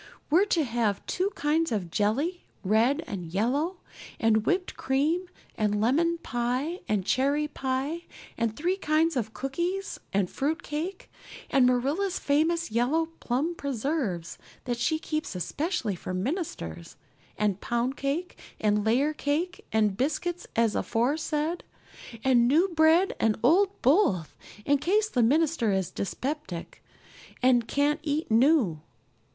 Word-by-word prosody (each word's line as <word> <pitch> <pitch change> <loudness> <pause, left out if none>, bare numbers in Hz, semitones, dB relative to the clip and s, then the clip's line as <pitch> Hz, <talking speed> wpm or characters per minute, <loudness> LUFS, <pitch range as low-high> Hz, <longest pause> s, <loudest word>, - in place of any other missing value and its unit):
We're 360 +6 +5
to 340 -6 +1
have 230 -5 -1
two 375 +2 0
kinds 310 +2 +1
of 190 -6 -2
jelly, 275 - 0 0.2
red 230 - +2
and 190 -8 -5
yellow, 280 - 0 0.4
and 220 -1 +2
whipped 365 0 0
cream 310 +7 0 0.3
and 210 -1 0
lemon 320 +10 +2
pie, 255 +8 -1
and 205 -3 0
cherry 280 +6 +1
pie, 275 +4 -3 0.3
and 230 -1 -1
three 360 +5 0
kinds 320 -2 +1
of 225 -3 -2
cookies, 345 +9 -3
and 195 -1 +1
fruit 305 - -2
cake, 335 +6 -5 0.4
and 270 -4 +5
Marilla's 285 +10 +1
famous 320 +1 +1
yellow 275 +9 +1
plum 275 +8 -1
preserves 265 - -3 0.2
that 240 -2 -3
she 315 +7 +1
keeps 310 - -4
especially 255 - -2
for 185 +1 -5
ministers, 185 - -4 0.4
and 205 -2 0
pound 240 +2 -1
cake 290 +7 -3 0.2
and 210 -1 +2
layer 260 +8 +2
cake, 310 +5 -2
and 210 -3 +2
biscuits 350 +6 -2
as 230 -2 +3
aforesaid; 305 +7 0 0.6
and 245 -3 +4
new 325 +9 +4
bread 330 +2 +4
and 220 -1 +2
old 380 +9 +3
both, 250 - +3 0.3
in 285 0 +3
case 415 +8 +2
the 250 - +1
minister 285 -2 +2
is 190 -3 -1
dyspeptic 200 - -5 0.6
and 245 -3 +4
can't 290 +2 +1
eat 300 -3 -2
new. 230 - +3
275 Hz, 135 wpm, -27 LUFS, 225-325 Hz, 0.6 s, We're